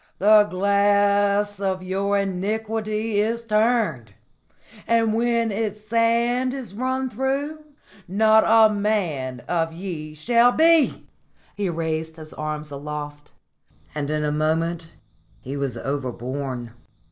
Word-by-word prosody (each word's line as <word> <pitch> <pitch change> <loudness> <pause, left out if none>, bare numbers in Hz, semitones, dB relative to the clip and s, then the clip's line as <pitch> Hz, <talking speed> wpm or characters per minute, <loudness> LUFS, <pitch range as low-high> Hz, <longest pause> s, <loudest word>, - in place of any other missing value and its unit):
The 210 +1 +6
glass 200 +1 +2
of 190 -2 -2
your 195 +2 0
iniquity 215 +2 -2
is 230 +2 -2
turned, 215 - 0 0.7
and 225 -1 +2
when 230 0 +1
its 210 0 -3
sand 235 +3 +1
is 245 -8 -7
run 260 +4 -1
through, 270 +6 -2 0.5
not 220 +3 +4
a 220 -1 +5
man 170 - -1
of 165 +1 -1
ye 165 -4 -6
shall 235 +9 +4
be!" 325 -2 +3 0.5
He 200 -2 -2
raised 160 -1 -3
his 155 -1 -10
arm 155 0 -4
aloft, 145 +1 -7 0.6
and 145 -1 -3
in 150 0 -1
a 150 - 0
moment 165 +2 -1 0.4
he 135 +2 -7
was 140 -4 -3
overborne. 130 -1 -4
200 Hz, 115 wpm, -23 LUFS, 155-225 Hz, 0.7 s, The